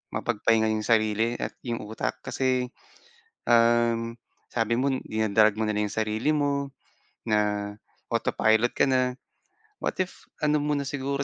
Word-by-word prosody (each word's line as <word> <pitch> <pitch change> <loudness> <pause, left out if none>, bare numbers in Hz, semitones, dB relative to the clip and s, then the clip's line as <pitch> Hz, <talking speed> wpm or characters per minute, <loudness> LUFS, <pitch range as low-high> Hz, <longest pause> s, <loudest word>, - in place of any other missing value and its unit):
mapagpahinga 110 -1 +2
'yong 110 -1 -2
sarili 110 +1 +2
at - - -3
'yong 120 -2 -3
utak 110 +1 -4
kasi, 130 -1 0 0.8
um, 115 0 +3 0.4
sabi 115 0 +1
mo 135 +2 +1 0.2
dina-drag 110 -1 +3
mo 110 - 0
na 105 - 0
lang 105 0 0
'yong - - -9
sarili 110 +5 -2
mo, 140 -1 0 0.6
na 105 -1 +1 0.4
autopilot 110 +2 +2
ka - - +5
na. 130 -1 +1 0.7
What - - -2
if 185 0 -3 0.2
ano 150 -1 +3
muna 145 -1 0
siguro 140 0 -2
115 Hz, 140 wpm, -26 LUFS, 110-130 Hz, 0.8 s, ka